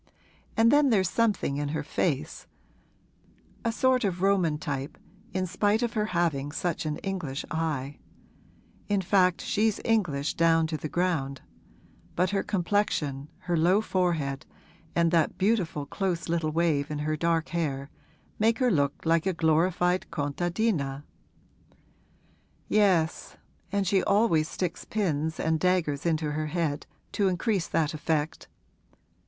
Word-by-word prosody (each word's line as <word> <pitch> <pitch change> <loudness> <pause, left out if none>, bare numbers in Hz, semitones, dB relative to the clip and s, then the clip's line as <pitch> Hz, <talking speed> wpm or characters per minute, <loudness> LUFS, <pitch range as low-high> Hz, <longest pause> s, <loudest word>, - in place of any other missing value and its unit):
'And 225 +1 +5
then 290 -1 +5
there's 190 -6 +2
something 215 -11 +1
in 145 0 -1
her 150 0 -2
face 150 0 -2 1.2
a 230 - +1
sort 255 +2 +2
of 185 -2 -1
Roman 185 -6 +2
type, 140 -3 -4 0.3
in 185 0 -1
spite 205 +5 +1
of 235 - -1
her 215 -1 0
having 165 -7 0
such 165 0 -2
an 150 - -2
English 175 -9 -3
eye. 150 -4 -2 0.9
In 200 -1 +2
fact 185 -1 +3
she's 215 0 +1
English 175 -11 +1
down 165 -1 +3
to 160 0 -3
the 155 0 -5
ground; 150 -7 -1 0.7
but 180 +2 +1
her 200 -1 +1
complexion, 170 -8 -1
her 175 -1 -1
low 175 +5 +4
forehead 170 -9 -1 0.5
and 170 -1 +3
that 165 -3 +2
beautiful 185 -8 0
close 180 0 -2
little 165 -2 0
wave 155 -3 +1
in 150 - -3
her 155 +1 -1
dark 165 +1 0
hair 145 -5 -2 0.5
make 225 +1 +3
her 250 -2 +2
look 145 -3 0
like 165 +2 +2
a 190 - +1
glorified 175 +3 +2
contadina.' 145 -1 -1 1.6
'Yes, 185 -6 +1 0.3
and 200 -1 0
she 190 +1 +3
always 200 -7 +2
sticks 180 -3 -3
pins 160 -7 -1
and 160 0 +1
daggers 170 -5 +1
into 155 -2 0
her 155 +1 -2
head, 155 -2 -2 0.2
to 200 -2 +1
increase 190 0 0
that 160 -1 0
effect. 155 0 -2
170 Hz, 135 wpm, -27 LUFS, 150-195 Hz, 1.6 s, And